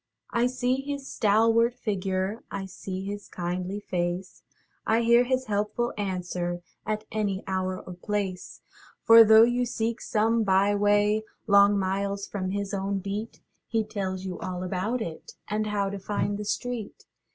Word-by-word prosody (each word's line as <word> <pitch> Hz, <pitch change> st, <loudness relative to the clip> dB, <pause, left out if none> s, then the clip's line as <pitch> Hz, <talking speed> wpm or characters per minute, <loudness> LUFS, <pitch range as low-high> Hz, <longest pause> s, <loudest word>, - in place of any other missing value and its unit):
I 235 Hz, +1 st, +2 dB
see 255 Hz, +1 st, 0 dB
his 280 Hz, 0 st, -5 dB
stalwart 225 Hz, +3 st, +3 dB
figure, 195 Hz, -2 st, -2 dB
I 195 Hz, -1 st, -4 dB
see 190 Hz, 0 st, -6 dB
his 205 Hz, +1 st, -6 dB
kindly 180 Hz, +3 st, -3 dB
face, 180 Hz, -1 st, -3 dB, 0.4 s
I 225 Hz, +1 st, +2 dB
hear 235 Hz, +1 st, +5 dB
his 260 Hz, +1 st, 0 dB
helpful 210 Hz, +2 st, -1 dB
answer 180 Hz, -3 st, -3 dB, 0.2 s
At 215 Hz, 0 st, -2 dB
any 200 Hz, -3 st, -1 dB
hour 185 Hz, -1 st, -2 dB
or 180 Hz, -, -9 dB
place. 190 Hz, 0 st, -4 dB, 0.4 s
For, 230 Hz, 0 st, +9 dB
though 220 Hz, 0 st, +8 dB
you 240 Hz, +1 st, +2 dB
seek 230 Hz, -1 st, -2 dB
some 225 Hz, +1 st, +1 dB
by 195 Hz, 0 st, +3 dB
way 205 Hz, +1 st, +3 dB, 0.2 s
Long 200 Hz, -1 st, +6 dB
miles 200 Hz, +1 st, -1 dB
from 185 Hz, -2 st, -4 dB
his 200 Hz, +1 st, -3 dB
own 195 Hz, 0 st, -1 dB
beat, 200 Hz, +4 st, -5 dB, 0.3 s
He 225 Hz, -1 st, +1 dB
tells 195 Hz, -3 st, -4 dB
you 180 Hz, -2 st, -5 dB
all 180 Hz, 0 st, -4 dB
about 200 Hz, +6 st, -1 dB
it, 160 Hz, -5 st, -8 dB
And 215 Hz, +1 st, -1 dB
how 200 Hz, -2 st, 0 dB
to 200 Hz, -, -5 dB
find 205 Hz, +1 st, -2 dB
the 210 Hz, -, -4 dB
street. 235 Hz, 0 st, -4 dB
205 Hz, 155 wpm, -27 LUFS, 190-225 Hz, 0.4 s, For